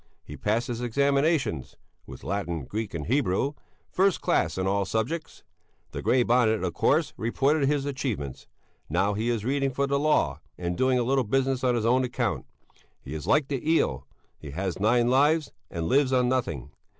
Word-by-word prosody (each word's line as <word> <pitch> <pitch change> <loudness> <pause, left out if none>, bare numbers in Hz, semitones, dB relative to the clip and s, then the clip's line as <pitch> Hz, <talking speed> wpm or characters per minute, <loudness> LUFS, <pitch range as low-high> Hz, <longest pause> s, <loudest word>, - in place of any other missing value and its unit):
He 75 - -9
passed 110 +8 0
his 120 -1 -4
examinations 140 - +1 0.3
(with - - -10
Latin, 85 -7 -3
Greek 110 - -4
and 75 - -4
Hebrew) 135 +1 +1 0.4
first 190 0 +2
class 80 +2 +1
in 95 - -1
all 100 +1 +1
subjects. 115 - -3 0.5
The - - -5
Grey 125 -1 +3
Bonnet, 115 -4 +2
of 90 -2 -1
course, 150 - +2
reported 135 +5 +1
his 145 -2 0
achievements. 125 - -4 0.4
Now 95 +6 +1
he 110 +3 -1
is 115 -3 -1
reading 135 +1 +1
for 140 +2 -1
the 140 0 0
law, 155 +1 +2 0.2
and 90 0 -3
doing 130 +4 +2
a 125 - +1
little 135 +2 +2
business 130 +3 0
on 125 -1 +3
his 115 -2 -1
own 125 +3 +3
account. 125 -1 -2 0.5
He 70 - -9
is 80 -1 -6
like 150 -2 +3
the 135 -3 -2
eel; 165 - +1 0.3
he 75 - -9
has 90 +5 -3
nine 120 +3 +3
lives 145 +5 +3 0.2
and 85 -2 -4
lives 135 0 +3
on 125 -1 +3
nothing. 110 - -2
125 Hz, 180 wpm, -26 LUFS, 100-140 Hz, 0.5 s, Grey